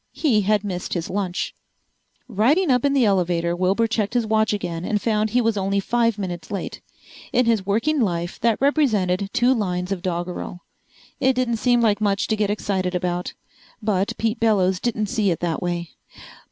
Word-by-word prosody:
He 245 -10 +2
had 210 +1 +1
missed 185 -3 -4
his 170 -2 -3
lunch. 190 -2 -2 0.7
Riding 260 - +2
up 250 -1 +2
in 280 - +2
the 265 -4 +3
elevator 175 -3 +1
Wilbur 190 +5 +2
checked 220 0 -1
his 240 -2 +2
watch 220 0 +2
again 180 -5 -3
and 210 +2 0
found 215 0 0
he 245 +4 +2
was 225 -2 +1
only 195 0 0
five 230 +1 +1
minutes 175 -4 -5
late. 200 - -5 0.5
In 250 0 +3
his 220 -5 +1
working 265 +10 +1
life 175 -4 -2
that 230 -2 +1
represented 210 -10 +1
two 245 +1 +3
lines 180 -5 -2
of 190 -3 -2
doggerel. 175 0 -4 0.6
It 265 0 +3
didn't 250 -2 0
seem 240 +1 +2
like 215 -2 +2
much 200 -1 +1
to 220 - +2
get 210 -1 0
excited 190 -3 -1
about. 180 0 -2 0.4
But 205 -3 -1
Pete 225 +1 -1
Bellows 190 -5 +2
didn't 215 -2 -1
see 210 -2 0
it 170 - -1
that 170 -2 -1
way. 175 -1 -3
205 Hz, 180 wpm, -22 LUFS, 180-230 Hz, 0.7 s, the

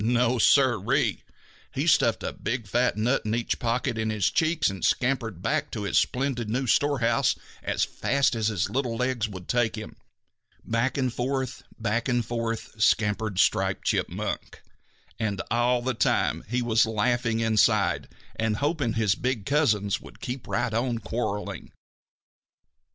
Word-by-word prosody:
No, 120 +1 +2
Sir 130 -3 +4
ee! - - +1 0.5
He - - -2
stuffed - - +3
a - - -3
big 120 -1 -3
fat 120 +3 +1
nut 120 +5 +1
in 110 +1 -1
each 115 - -1
pocket 115 -1 -1
in 110 0 0
his 105 -4 +1
cheeks 160 -1 +2
and 95 -1 -4
scampered 115 -8 0
back 110 - 0
to 105 - -5
his 100 - +3
splendid 125 -4 -1
new 130 +4 -1
storehouse 125 -3 +2 0.3
as - - 0
fast 140 -1 +1
as 110 -2 0
his 100 -5 0
little 120 +2 -1
legs 125 -3 0
would 95 -3 -9
take 120 -2 +1
him. 110 - -8 0.7
Back 115 +4 0
and 130 -3 0
forth, 130 +1 -2 0.2
back 115 +2 -1
and 120 -2 +1
forth, 115 -1 -4
scampered 105 -2 +2
Striped - - +2
Chipmunk, - - -2 0.6
and 105 -3 -1
all 120 +1 +2
the 130 +1 0
time 80 - +1
he 125 +1 0
was 110 -1 +3
laughing 115 +1 0
inside 110 -2 +2 0.3
and 110 -1 0
hoping 145 -5 0
his 110 -3 +2
big 125 -2 -2
cousins 110 - +1
would - - -14
keep 125 0 -6
right 115 - -1
on 120 +1 0
quarreling. 105 -1 -4
115 Hz, 155 wpm, -26 LUFS, 110-125 Hz, 0.7 s, Sir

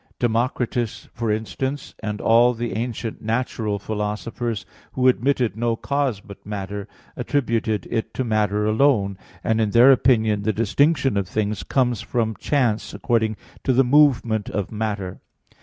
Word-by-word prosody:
Democritus, 120 0 -1
for 115 -2 -2
instance, 130 +6 -3
and 105 -1 -4
all 120 +2 +5
the 115 -2 -3
ancient 115 +1 -4
natural 110 -2 -1
philosophers, 105 +2 -3 0.3
who 130 0 +2
admitted 125 -4 +2
no 115 0 0
cause 140 -3 -1
but 100 -1 -13
matter, 100 -1 -5 0.3
attributed 115 -7 -1
it 115 -2 -2
to 130 - -2
matter 105 -2 +1
alone; 110 -3 +2 0.3
and 115 0 +1
in 110 - +1
their 120 +5 +7
opinion 110 -5 +3
the 110 +2 +1
distinction 130 +3 +2
of 100 -2 -1
things 105 +1 -2
comes 125 -4 0
from 110 -3 -1
chance 120 -4 0
according 110 -3 0 0.3
to 135 - +2
the 130 +1 +4
movement 125 -5 +3
of 100 -6 -3
matter. 105 -4 -3
115 Hz, 140 wpm, -22 LUFS, 105-125 Hz, 0.3 s, their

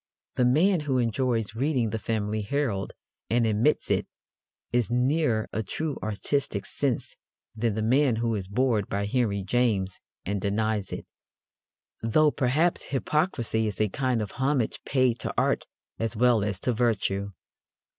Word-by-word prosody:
The 125 - +2
man 170 +9 +4
who 145 -3 0
enjoys 115 -2 0
reading 125 -2 0
The 110 - -2
Family 110 -1 -1
Herald, 105 -4 -1 0.4
and 115 0 +3
admits 110 +7 +2
it, - - +1 0.7
is 120 -4 +2
nearer 125 -2 +1
a 110 - 0
true 155 +6 -3
artistic 110 +1 -1
sense 135 -5 -2 0.4
than 110 -1 0
the 110 - -1
man 130 +2 +3
who 115 0 0
is 100 -4 -3
bored 110 -1 +1
by 100 0 -1
Henry 105 -3 0
James 100 -4 0 0.3
and 100 +1 -2
denies 105 0 -1
it: - - -5 1.0
though, 150 +7 +4
perhaps, 145 +7 +1
hypocrisy 130 - 0
is 100 -3 -4
a 110 -1 +2
kind 125 0 0
of 105 - -7
homage 130 -3 0
paid 130 -3 +2
to - - -3
art - - +1 0.3
as 115 +1 -1
well 120 -2 +4
as 100 -2 -1
to 125 - +1
virtue. 100 -4 0
115 Hz, 150 wpm, -27 LUFS, 105-130 Hz, 1.0 s, man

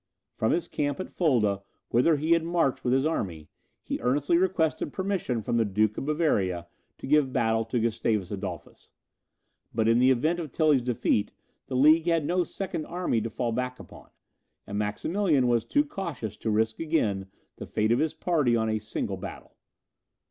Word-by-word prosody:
From 110 - 0
his 170 0 0
camp 145 -1 -2
at 185 - -5
Fulda, 110 - +1 0.3
whither 130 +7 +4
he 155 +3 -1
had 165 -1 +4
marched 165 -5 0
with 125 - +1
his 135 +2 +2
army, 85 - -3 0.3
he - - -3
earnestly 140 +6 +1
requested 175 -3 +1
permission 185 - -2
from 120 - 0
the 115 - +4
Duke 105 +1 +1
of - - -4
Bavaria 100 - +1 0.3
to - - -8
give 145 -1 +3
battle 115 -2 +1
to 115 +2 -1
Gustavus 110 -4 0
Adolphus. 100 -1 -7 0.8
But, 110 -1 +2
in 115 +1 +4
the 130 +1 +5
event 155 +7 +2
of 155 -5 -5
Tilly's 150 -4 +3
defeat, 115 -3 0 0.3
the 130 - -4
League 155 +5 +5
had 165 -3 +2
no 180 +3 +1
second 170 -2 -5
army 175 -10 -1
to 115 - -3
fall 120 +2 -2
back 125 +2 -3
upon, - - -13 0.6
and 100 - -6
Maximilian 140 - +1
was 120 -2 +2
too 290 - +2
cautious 165 - -5
to 110 - -3
risk 110 +1 +1
again 110 -13 0 0.3
the - - -8
fate 110 +1 0
of 120 - +3
his 160 0 0
party 155 -8 +1
on 110 -1 +1
a 110 0 0
single 105 +1 -3
battle. - - -9
125 Hz, 180 wpm, -27 LUFS, 110-160 Hz, 0.8 s, the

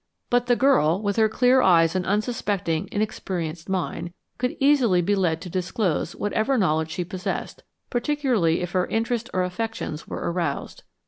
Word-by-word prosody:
But 245 0 +2
the 245 - +4
girl, 235 - +3
with 205 -1 -2
her 220 -1 +4
clear 250 +3 +4
eyes 165 -5 +5
and 185 -1 -1
unsuspecting, 205 -6 -1
inexperienced 180 -6 -3
mind, 175 -2 -3 0.3
could 250 +1 -1
easily 270 -10 +4
be 185 +4 +1
led 170 -5 +1
to 180 - -7
disclose 185 -2 -1
whatever 220 +6 0
knowledge 160 -6 +1
she 175 +2 -3
possessed, 185 +1 -4 0.3
particularly 245 - +1
if 175 -1 -3
her 185 0 +1
interest 235 +1 -1
or 185 - +1
affections 180 -4 -4
were - - -3
aroused. 170 -5 -3
195 Hz, 155 wpm, -24 LUFS, 175-235 Hz, 0.3 s, eyes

